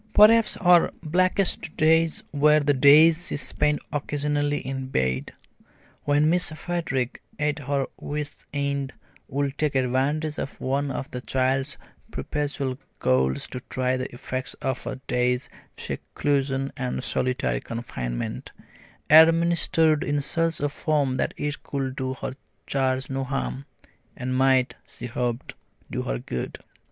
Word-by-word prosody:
Perhaps 215 0 +6
her 175 -2 +5
blackest 180 0 +1
days 160 +1 +3
were 150 +1 +5
the 145 -1 +2
days 155 +5 +6
she - - -2
spent 150 0 0
occasionally 145 0 0
in 135 -1 -4
bed, 65 - -1 0.7
when 145 +1 +3
Miss 180 +2 +2
Frederick, 155 -6 -3 0.2
at 150 0 0
her 140 -1 -1
wit's 145 -1 -5
end, 140 -1 -2 0.3
would 140 0 -2
take 150 -2 +1
advantage 135 +4 0
of 140 - -5
one 140 +2 -1
of 135 0 -5
the 125 - -5
child's 135 +3 0 0.3
perpetual 140 - -3 0.2
colds 65 +2 +1
to 125 - -6
try 130 0 0
the 130 0 -4
effects 130 +1 -4
of 130 -2 -3
a - - -3
day's 125 +1 0 0.3
seclusion 135 -1 -1
and 125 0 -3
solitary 125 - 0
confinement, 60 - -5 0.6
administered 160 0 +5
in 145 0 0
such 165 +3 0
a 145 - +1
form 145 -3 0
that - - -1
it 145 0 -3
could 135 -2 -3
do 130 -1 -3
her - - -5 0.3
charge 130 -1 0
no 135 0 -2
harm, 135 +1 -3 0.5
and 130 -1 -2
might, 130 -1 +3
she - - -9
hoped, 120 0 -3 0.4
do - - -2
her - - -2
good. 60 +1 -5
140 Hz, 135 wpm, -25 LUFS, 130-150 Hz, 0.7 s, Perhaps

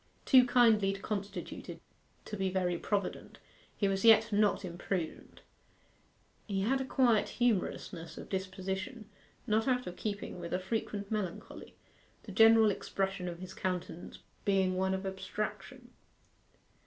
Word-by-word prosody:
Too 255 -2 +7
kindly 225 -5 +4
constituted 200 0 -5 0.5
to 210 - -5
be 190 -2 0
very 180 -1 0
provident, 200 -3 -3 0.4
he 200 - +2
was 195 0 -1
yet 225 -1 +6
not 205 -1 +2
imprudent. 175 -1 -5 1.1
He 195 -2 -1
had 265 +7 +1
a - - -2
quiet 240 -5 +3
humorousness 185 -7 -1
of - - -8
disposition, 190 +3 -4 0.4
not 220 0 +1
out 250 -1 +1
of 180 - -6
keeping 205 -3 -4
with 170 0 -6
a - - 0
frequent 205 +1 -3
melancholy, 205 -5 -5 0.5
the 205 - -9
general 225 +1 +6
expression 195 -1 -3
of 170 -1 -5
his 185 +1 -9
countenance 180 -2 -4 0.3
being 190 -2 +2
one 190 +1 +1
of 190 +1 -5
abstraction. 210 +5 -5
195 Hz, 130 wpm, -32 LUFS, 190-220 Hz, 1.1 s, Too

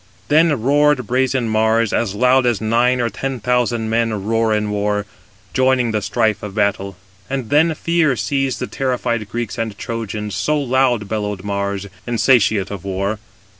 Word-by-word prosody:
Then 150 -5 +3
roared 145 -1 +3
brazen 130 +1 0
Mars, 110 0 +2
as 105 -4 0
loud 125 +2 +3
as 120 -5 +1
nine 120 +3 +2
or 120 -2 0
ten 135 +4 -4
thousand 120 -1 0
men 115 -3 0
roar 115 0 +1
in 105 -1 0
war, 105 0 -1 0.5
joining 130 -2 +2
the 105 -1 -1
strife 105 +1 0
of 105 -1 -7
battle. 100 -2 0 0.3
And 130 -5 -4
then 155 +2 +3
fear 165 -5 +1
seized 135 +1 -1
the - - -3
terrified 120 -5 -2
Greeks 120 0 -4
and 110 -3 -3
Trojans, 105 -3 -5
so 150 0 0
loud 130 -5 +1
bellowed 105 -3 -3
Mars, 100 -1 -2 0.2
insatiate 110 -4 +2
of 100 -4 -6
war. 100 +2 -2
115 Hz, 160 wpm, -19 LUFS, 105-130 Hz, 0.5 s, Then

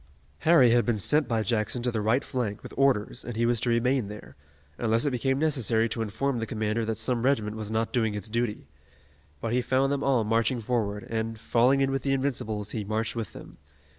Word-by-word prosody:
Harry 135 - +5
had 120 0 +4
been 120 -3 0
sent 150 +9 +2
by 115 -2 0
Jackson 115 +1 -1
to 125 - 0
the 110 -2 -2
right 110 +6 +2
flank 115 -6 -3
with - - -9
orders 130 -4 +1
and 120 - -6
he 115 +1 +1
was 120 -1 +1
to 125 - 0
remain 120 0 +1
there, 105 +1 -10 0.4
unless 115 +1 +1
it 145 - +1
became 135 +2 0
necessary 125 -7 +2
to 115 0 -4
inform 120 +4 -1
the 115 - -3
commander 110 -1 -1
that 110 -1 -2
some 125 -3 +1
regiment 110 -5 +1
was 110 -1 -5
not 110 +2 -1
doing 110 -4 +1
its 105 +1 -4
duty. 115 - -2 0.7
But 115 - -2
he 125 - +2
found 130 +2 +1
them 140 0 -1
all 130 -5 +2
marching 115 +3 +1
forward, 105 -3 -2
and, 115 0 -3
falling 125 +5 +3
in 135 0 +2
with 135 0 -1
the 135 +1 0
Invincibles, 110 -6 -2
he 110 - -3
marched 110 +3 -2
with 115 -4 -4
them. - - -12
115 Hz, 220 wpm, -27 LUFS, 110-130 Hz, 0.7 s, Harry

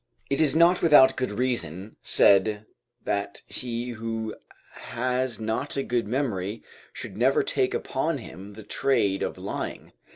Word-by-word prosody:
It 140 +3 +2
is 155 -2 +4
not 170 +2 +5
without 135 -5 +7
good 130 -4 -2
reason 105 -5 -2
said 105 +2 +4 0.4
"that 100 0 -3
he 120 -1 -4
who 115 -1 -4 0.4
has 125 -1 -2
not 110 +6 -2
a 135 - 0
good 120 -4 -1
memory 110 -5 -2 0.3
should - - -8
never - - +3
take - - 0
upon - - -1
him 95 +5 -10
the 110 +1 -10
trade 100 -4 +1
of - - -3
lying." - - -6
115 Hz, 140 wpm, -26 LUFS, 105-130 Hz, 0.4 s, without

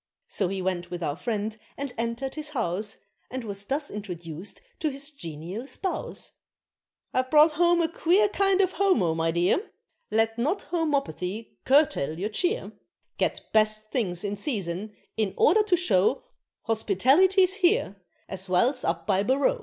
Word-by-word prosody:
So 195 - 0
he 190 0 -3
went 175 -2 -2
with 175 0 -5
our 145 -2 -1
friend 215 +3 -2 0.2
and 275 -2 -4
entered 235 +3 -3
his 305 -1 -5
house, 210 - -2 0.3
And 260 0 -4
was 200 -2 -4
thus 285 +5 -2
introduced 175 -3 -7 0.2
to 310 - +1
his 280 +2 -5
genial 175 - -7
spouse. 380 +5 -4 0.8
"I've 255 0 +1
brought 305 +2 +7
home 345 +2 +3
a - - +2
queer 355 +5 +3
kind 395 -1 +2
of 375 -1 +2
homo, 365 - +2
my 165 0 0
dear, 175 - +1 0.4
Let 225 +1 +1
not 310 +12 0
home 325 -3 -1
opathy 210 - -3 0.2
curtail 260 - +3
your 200 +5 -2
cheer, 360 - -1 0.5
Get - - 0
best 215 0 +2
things 190 -8 -1
in 205 0 -2
season, 205 - -3 0.2
in 210 -4 0
order 420 +8 +5
to 415 -4 +2
show 215 - +2 0.4
Hospitality's 290 - +3
here 370 - +2 0.3
as 190 0 -6
well's 240 +9 +2
up 165 0 -1
by 195 0 +2
Barroo!" 265 +5 +2
225 Hz, 155 wpm, -26 LUFS, 190-305 Hz, 0.8 s, brought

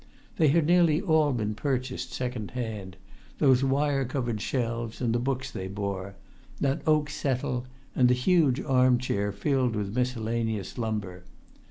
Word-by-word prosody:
They 160 - +4
had 155 +2 +3
nearly 170 -2 +4
all 160 -6 +3
been 110 -4 -1
purchased 130 +2 -2
second 125 -4 -4
hand, 105 -6 -5 0.4
those 135 -3 +4
wire 135 +1 +1
covered 120 -4 -2
shelves 115 -2 -2
and 120 -3 0
the 120 - +1
books 130 +1 -2
they 95 - -5
bore, 100 -1 -4 0.4
that 140 -1 0
oak 155 -1 +3
settle, 130 -3 -2 0.3
and 125 - +5
the 125 - +4
huge 145 -1 +3
arm 130 -3 +4
chair 100 -5 -1
filled 125 +3 0
with 105 0 -3
miscellaneous 115 -4 -2
lumber. 105 -6 -3
125 Hz, 150 wpm, -27 LUFS, 110-135 Hz, 0.4 s, and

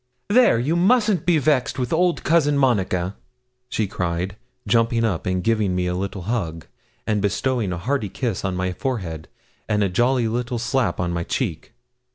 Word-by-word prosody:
'There, 240 - +5
you 140 +8 0
mustn't 205 -1 +3
be 175 -2 +5
vexed 145 -3 +1
with 125 +1 -2
old 175 +1 +2
Cousin 150 -3 +3
Monica,' 95 -8 +1 0.5
she 110 - 0
cried, 90 0 -3 0.3
jumping 115 0 +2
up, 100 -7 -1
and 90 -1 0
giving 105 -5 +1
me 90 0 0
a 90 - -1
little 95 0 -4
hug, 85 -7 -3 0.4
and 105 -2 0
bestowing 110 +1 0
a 90 - -3
hearty 110 +2 -1
kiss 115 0 -3
on 95 -1 -1
my 90 0 -1
forehead, 90 - -4 0.4
and 105 -1 +2
a 100 - +1
jolly 120 +5 +2
little 120 +2 -2
slap 125 +2 0
on 85 -1 -1
my 85 - -1
cheek. 90 - -3
115 Hz, 175 wpm, -22 LUFS, 90-130 Hz, 0.5 s, There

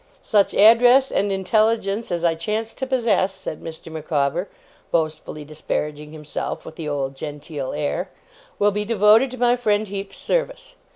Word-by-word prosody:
Such 205 -3 +2
address 245 +5 +6
and 200 0 +1
intelligence 215 +1 +1
as 170 -1 -2
I 170 -1 +3
chance 215 +7 -3
to 265 - -4
possess,' 230 -7 +1
said 185 -5 -7
Mr. 165 0 -9
Micawber, 155 +3 -1 0.4
boastfully 155 -2 -2
disparaging 150 0 -4
himself, 150 -1 -5
with 160 - -10
the 155 -2 -5
old 140 -2 -2
genteel 145 -1 -6
air, 150 +5 -2 0.5
'will 205 0 +3
be 210 +1 -2
devoted 220 +3 +4
to 255 - -8
my 245 0 +3
friend 215 -4 0
Heep's 195 0 -6
service. - - -2
195 Hz, 155 wpm, -22 LUFS, 155-225 Hz, 0.5 s, address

